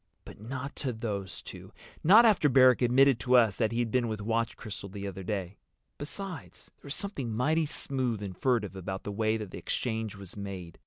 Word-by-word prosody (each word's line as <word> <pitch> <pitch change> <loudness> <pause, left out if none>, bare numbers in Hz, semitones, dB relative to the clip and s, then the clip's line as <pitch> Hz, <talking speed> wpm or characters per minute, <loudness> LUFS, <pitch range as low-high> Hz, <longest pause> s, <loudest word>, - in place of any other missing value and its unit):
But - - -12
not 135 +5 -5
to 130 -4 -2
those 100 -5 -5
two. - - -10 0.3
Not 215 +9 +8
after 200 -9 +4
Barrack 130 -1 +6
admitted 130 +1 +5
to 125 +4 +2
us 115 -5 +5
that 110 -2 +1
he'd 115 -1 -1
been 125 -1 +1
with 110 -2 -3
Watch 115 +2 -1
Crystal 105 -3 -7
the 100 +1 -7
other 95 -1 -5
day. 95 0 -4 0.4
Besides, 170 +2 -7
there - - -15
was 140 - -3
something 145 - -3
mighty 155 +8 +1
smooth 130 -7 -2
and 95 -2 -6
furtive 110 -7 0
about 95 +1 -5
the 105 - -4
way 110 +2 +1
that 105 -4 -7
exchange 110 -3 -3
was 95 -2 -11
made. 95 -4 -7
115 Hz, 195 wpm, -29 LUFS, 100-130 Hz, 0.4 s, Not